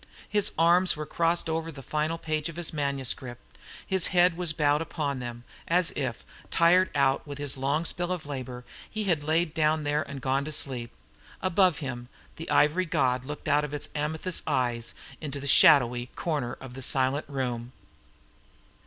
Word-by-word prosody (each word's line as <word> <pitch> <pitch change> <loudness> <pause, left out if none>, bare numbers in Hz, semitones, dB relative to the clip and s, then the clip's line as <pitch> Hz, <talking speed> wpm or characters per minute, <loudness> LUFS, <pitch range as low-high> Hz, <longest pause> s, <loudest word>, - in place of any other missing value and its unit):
His 205 -2 +1
arms 175 +3 +4
were 150 - -4
crossed 170 +3 0
over 165 0 -2
the 135 -4 -11
final 155 +3 -1
page 155 -1 -2
of 165 - -9
his 170 -2 0
manuscript; 135 -4 -3 0.3
his 190 -2 +1
head 180 -1 +4
was 175 -2 0
bowed 150 -1 +2
upon 150 -4 -3
them, 120 -1 -7 0.2
as 175 +1 +4
if, 130 -5 -4 0.2
tired 180 +3 +4
out 140 +1 +2
with 145 -1 -6
his 145 -2 -1
long 140 +5 0
spell 175 +1 -1
of 180 -4 -3
labour, 130 -3 -6 0.3
he 215 -1 -3
had 170 -7 +1
laid 160 +3 +1
it - - -22
down 155 -1 +1
there 145 +1 +1
and 140 -2 -6
gone 135 +2 0
to 155 - -4
sleep. 130 -5 0 0.5
Above 185 -3 +3
him, 120 -2 -6 0.3
the 165 - -7
ivory 155 +5 +3
god 130 -5 +1
looked 145 +2 -7
out 145 +1 +3
of 150 0 -4
its 145 - -4
amethyst 160 +4 -2
eyes 120 -2 -1 0.3
into 145 -2 -5
the 140 - -7
shadowy 125 -3 +5
corner 145 -8 -2
of 130 -2 -10
the 135 - -8
silent 130 +3 +1
room. 125 -4 -3
150 Hz, 180 wpm, -27 LUFS, 130-165 Hz, 0.5 s, shadowy